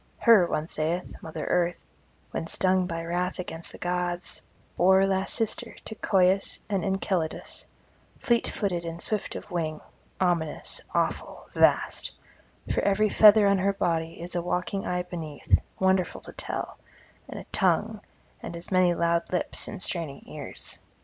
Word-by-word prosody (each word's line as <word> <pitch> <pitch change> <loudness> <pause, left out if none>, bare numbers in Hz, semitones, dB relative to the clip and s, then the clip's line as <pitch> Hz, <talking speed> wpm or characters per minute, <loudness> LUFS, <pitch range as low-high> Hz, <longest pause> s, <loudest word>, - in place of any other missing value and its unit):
Her, 220 -7 +6
one 155 -1 -2
saith, 165 +3 -2
Mother 160 -1 -6
Earth, 175 -1 0 0.5
when 165 - -3
stung 185 +1 +3
by 165 -1 -4
wrath 180 +2 -1
against 170 -2 -6
the - - -11
gods, 175 0 -2 0.3
bore 190 +1 +5
last 190 0 0
sister 230 +1 -1
to - - -3
Coeus 190 -2 +2
and 195 -3 -1
Enceladus, 190 -4 -2 0.5
fleet 235 -1 +1
footed 180 -5 -2
and 165 0 -5
swift 210 +3 -1
of - - -8
wing, 160 -3 -2 0.4
ominous, 170 -4 0
awful, - - -1
vast; - - +2 0.6
for - - +1
every 210 +2 +2
feather 210 0 +7
on 200 -1 +3
her 200 +1 +2
body 165 -3 -1
is 175 +1 -4
a 175 - 0
waking 180 +3 -2
eye 180 0 -1
beneath, 160 -5 -1 0.2
wonderful 190 -2 +1
to - - -8
tell, - - -4 0.5
and - - -7
a - - -8
tongue, - - +1 0.4
and 170 - -6
as 170 +3 -8
many 180 -2 +4
loud 170 0 +1
lips 180 - -1
and 195 - -4
straining 165 -6 -1
ears. - - -5
180 Hz, 150 wpm, -27 LUFS, 170-195 Hz, 0.6 s, feather